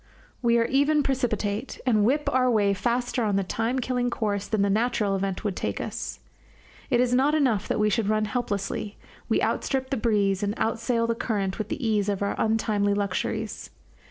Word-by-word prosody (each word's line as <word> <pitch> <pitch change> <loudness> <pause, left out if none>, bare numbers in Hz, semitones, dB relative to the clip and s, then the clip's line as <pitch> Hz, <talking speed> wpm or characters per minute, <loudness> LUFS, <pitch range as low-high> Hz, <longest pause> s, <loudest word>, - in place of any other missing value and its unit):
We 235 -1 +3
are 230 - +3
even 285 +3 +3
precipitate, 240 -4 -1
and 220 -5 +3
whip 285 +7 +1
our 255 0 +3
way 205 -4 +3
faster 240 +4 -1
on 205 -2 +1
the 195 - +2
time 225 +6 -1
killing 250 -1 0
course 205 -4 -2
than 215 -2 +1
the 200 - +2
natural 215 -2 +1
event 195 +1 -2
would 205 -4 -1
take - - -3
us. - - -5 0.7
It 245 -3 +3
is 250 0 +2
not 275 +4 +3
enough 245 -9 +1
that - - 0
we 210 0 +3
should 210 0 +1
run 215 0 +2
helplessly, 210 -2 -3 0.3
we - - +2
outstrip 265 -1 -1
the 270 - +1
breeze 205 -4 +1
and 205 +1 -1
outsail 230 +1 0
the 230 - +1
current 205 -4 -2
with 215 -1 -3
the 245 +1 -2
ease 210 -2 +1
of 200 0 -1
our 200 - 0
untimely 215 -2 +1
luxuries. 205 +2 -2
220 Hz, 190 wpm, -26 LUFS, 205-245 Hz, 0.7 s, We